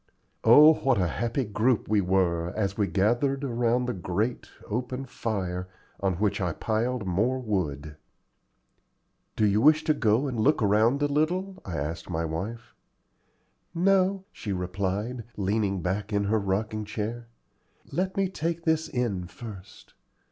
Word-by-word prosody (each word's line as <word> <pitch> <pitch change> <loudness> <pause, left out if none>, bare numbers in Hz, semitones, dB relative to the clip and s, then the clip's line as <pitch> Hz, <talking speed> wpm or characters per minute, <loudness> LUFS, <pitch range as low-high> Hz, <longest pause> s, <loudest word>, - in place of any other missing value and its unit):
Oh, 150 +7 +8
what 135 -6 +1
a 90 - +2
happy 120 - -1
group 110 +3 +1
we 105 -1 +3
were, 90 -2 +1
as 100 -2 0
we 100 -1 +1
gathered 120 +9 +1
around 120 -1 +1
the 125 - -2
great, 100 +6 -2 0.2
open 125 +4 -3
fire, 95 -7 -3 0.3
on 95 -1 +1
which 100 +1 0
I 90 -3 0
piled 115 +3 -1
more 105 +8 +1
wood! 80 - -3 1.4
"Do 110 - +2
you 105 +1 +3
wish 155 +3 +5
to 155 - +3
go 125 -2 +2
and 125 -5 -3
look 145 +8 +3
around 110 +7 +3
a - - +4
little?" 180 +6 -1
I 90 -4 -4
asked 80 +4 -4
my 80 -1 -1
wife. 95 +9 -5 1.0
"No," 190 +2 +2
she 105 - -6
replied, 100 +6 -2
leaning 100 -2 0
back 100 +3 -2
in 100 -1 +1
her 110 +2 +1
rocking 105 +2 -1
chair: 110 +3 -4 0.6
"let 190 +2 -2
me 195 -1 +2
take 170 -2 -3
this 160 -1 +1
in 105 -8 -2
first. 100 -4 -11
110 Hz, 150 wpm, -27 LUFS, 95-130 Hz, 1.4 s, Oh